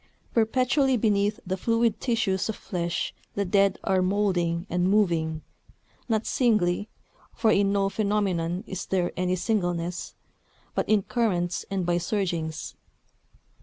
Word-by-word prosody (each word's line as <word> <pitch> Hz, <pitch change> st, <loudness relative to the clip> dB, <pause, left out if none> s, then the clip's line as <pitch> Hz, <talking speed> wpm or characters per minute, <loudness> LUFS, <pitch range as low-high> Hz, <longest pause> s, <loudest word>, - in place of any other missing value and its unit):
Perpetually 255 Hz, +4 st, +2 dB
beneath 210 Hz, 0 st, +1 dB
the 190 Hz, +1 st, -2 dB
fluid 230 Hz, +1 st, +1 dB
tissues 220 Hz, -6 st, 0 dB
of 220 Hz, -, -2 dB
flesh 175 Hz, -2 st, -3 dB, 0.2 s
the 200 Hz, -, 0 dB
dead 195 Hz, +1 st, +3 dB
are 190 Hz, -1 st, +2 dB
moulding 185 Hz, -3 st, +1 dB
and 180 Hz, 0 st, +1 dB
moving 165 Hz, -6 st, +1 dB, 0.7 s
not 220 Hz, -1 st, +1 dB
singly 210 Hz, -5 st, +1 dB, 0.5 s
(for 220 Hz, -, +3 dB
in 200 Hz, -1 st, +3 dB
no 200 Hz, -1 st, +2 dB
phenomenon 195 Hz, -4 st, 0 dB
is 190 Hz, -4 st, -6 dB
there 180 Hz, -2 st, 0 dB
any 180 Hz, 0 st, 0 dB
singleness), 175 Hz, -4 st, -2 dB, 0.6 s
but -, -, -1 dB
in 215 Hz, -2 st, +4 dB
currents 180 Hz, -8 st, -1 dB
and 195 Hz, -2 st, -1 dB
by 175 Hz, 0 st, +1 dB
surgings. 170 Hz, -5 st, -2 dB
195 Hz, 130 wpm, -26 LUFS, 175-215 Hz, 0.7 s, in